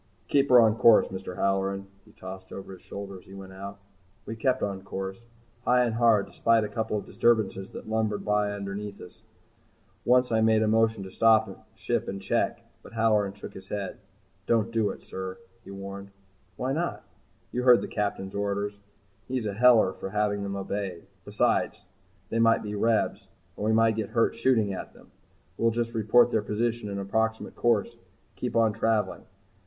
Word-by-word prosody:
"Keep 140 0 +3
her 125 - +8
on 110 -1 +4
course, 115 -2 +6
Mr. 95 -1 -6
Halloran," 95 0 0 0.2
he 105 - -19
tossed 95 -3 -10
over 95 0 -8
his 95 - -13
shoulder 100 -1 -8
as - - -21
he 95 - -12
went 95 -1 -10
out. 100 +1 -8 0.5
We 115 - -5
kept 130 +3 0
on 100 -2 -2
course 95 +1 -6 0.4
high 125 0 +4
and 120 -2 0
hard 115 -3 +4
despite 115 -1 +2
a 105 - -3
couple 110 0 -2
of 100 - -5
disturbances 110 -4 +1
that - - -8
lumbered 110 -1 -1
by 105 -1 +1
underneath 100 0 -5
us. 90 - -13 0.8
Once 125 0 +3
I 110 0 +3
made 110 0 +4
a - - +1
motion 110 -1 +2
to 95 - -9
stop 110 0 +2
ship - - -2
and 95 - -4
check, 95 - -1 0.2
but - - -14
Halloran 105 -3 +2
shook 100 - -10
his 95 0 -11
head. 100 -1 -4 0.5
"Don't 115 -1 +2
do 110 -3 +1
it, - - -8
sir," 95 0 -6 0.3
he - - -13
warned. 100 0 -8 0.5
"Why 130 +2 -1
not?" 170 +4 -2 0.5
"You 125 - -1
heard 125 -1 +6
the - - -4
Captain's 100 -2 -3
orders. 100 0 -2 0.5
He's 125 -3 -2
a 105 - -2
heller 115 -3 +5
for - - -6
having 105 0 0
them 100 0 -3
obeyed. 95 -3 -4 0.2
Besides, - - 0 0.5
they 115 - 0
might 115 0 +4
be 105 -1 -5
Rebs 110 -2 0 0.3
and 105 - -4
we 110 - +2
might 110 0 +3
get 110 -3 -2
hurt 115 -1 +2
shooting 115 -4 +2
at 95 - -7
them. - - -19 0.5
We'll 115 - +4
just 115 0 -2
report 115 +2 +4
their 110 - +2
position 115 +1 -2
and 100 0 -4
approximate 110 +3 -1
course 115 -4 +1
and - - -27 0.3
keep - - -4
on 115 -2 +3
travelling. 110 -1 0
105 Hz, 185 wpm, -27 LUFS, 100-115 Hz, 0.8 s, her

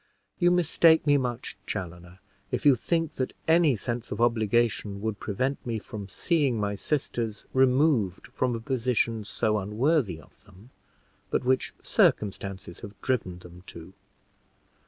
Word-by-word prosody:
You 175 -1 +5
mistake 165 -2 +4
me 145 -1 +5
much, 125 -3 -3
Chaloner, 90 0 -6 0.3
if - - -3
you 145 - +8
think 165 +6 -1
that 130 - -2
any 160 -4 +5
sense 120 +2 -4
of - - -4
obligation 115 -3 +1
would 110 -2 -2
prevent 130 +7 -2
me 115 -2 -2
from 105 -2 -8
seeing 140 - 0
my 100 -1 -1
sisters 115 -2 -3
removed 130 - +2
from 125 -2 -1
a - - -4
position 115 -2 0
so 105 +1 0
unworthy 105 - 0
of 95 +4 -20
them, 100 +5 -18 0.6
but - - 0
which 130 +1 +1
circumstances 95 -3 0
have 100 -2 -11
driven 105 -9 -1
them 90 0 -13
to. 85 +3 -11
115 Hz, 140 wpm, -27 LUFS, 100-135 Hz, 0.6 s, you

